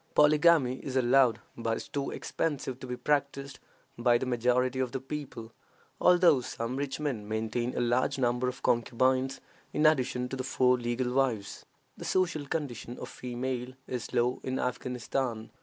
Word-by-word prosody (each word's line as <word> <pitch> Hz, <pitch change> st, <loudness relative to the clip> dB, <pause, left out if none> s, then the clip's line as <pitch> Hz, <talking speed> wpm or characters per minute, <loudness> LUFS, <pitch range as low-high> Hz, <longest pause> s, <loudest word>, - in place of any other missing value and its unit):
Polygamy 150 Hz, -3 st, +5 dB
is 135 Hz, -1 st, -6 dB
allowed, 130 Hz, -1 st, +4 dB
but 115 Hz, -1 st, -1 dB
is -, -, -7 dB
too 140 Hz, -1 st, -3 dB
expensive 140 Hz, -5 st, -3 dB
to 130 Hz, -, -8 dB
be 125 Hz, 0 st, -4 dB
practiced 140 Hz, -1 st, -1 dB, 0.4 s
by 120 Hz, 0 st, +4 dB
the 130 Hz, -, -3 dB
majority 125 Hz, +1 st, +1 dB
of 130 Hz, -2 st, -1 dB
the 135 Hz, -, -1 dB
people, 135 Hz, -5 st, -7 dB, 0.5 s
although 175 Hz, -6 st, +5 dB
some 120 Hz, 0 st, -4 dB
rich 140 Hz, 0 st, -3 dB
men 130 Hz, -9 st, -3 dB
maintain 110 Hz, +3 st, -2 dB
a -, -, +1 dB
large 125 Hz, +4 st, +1 dB
number 125 Hz, 0 st, +1 dB
of 125 Hz, -, -5 dB
concubines 130 Hz, +3 st, +1 dB, 0.3 s
in 150 Hz, -, +2 dB
addition 130 Hz, -4 st, +2 dB
to 135 Hz, -, -5 dB
the 130 Hz, -, -3 dB
four 125 Hz, -1 st, +3 dB
legal 120 Hz, +1 st, -1 dB
wives. 125 Hz, -7 st, -1 dB, 0.3 s
The -, -, -7 dB
social 165 Hz, -6 st, 0 dB
condition 125 Hz, -6 st, -4 dB
of -, -, -7 dB
females 125 Hz, 0 st, -4 dB
is 125 Hz, -3 st, -5 dB
low 120 Hz, +1 st, +1 dB
in 130 Hz, 0 st, -2 dB
Afghanistan. 125 Hz, -2 st, -2 dB
130 Hz, 160 wpm, -29 LUFS, 120-135 Hz, 0.5 s, Polygamy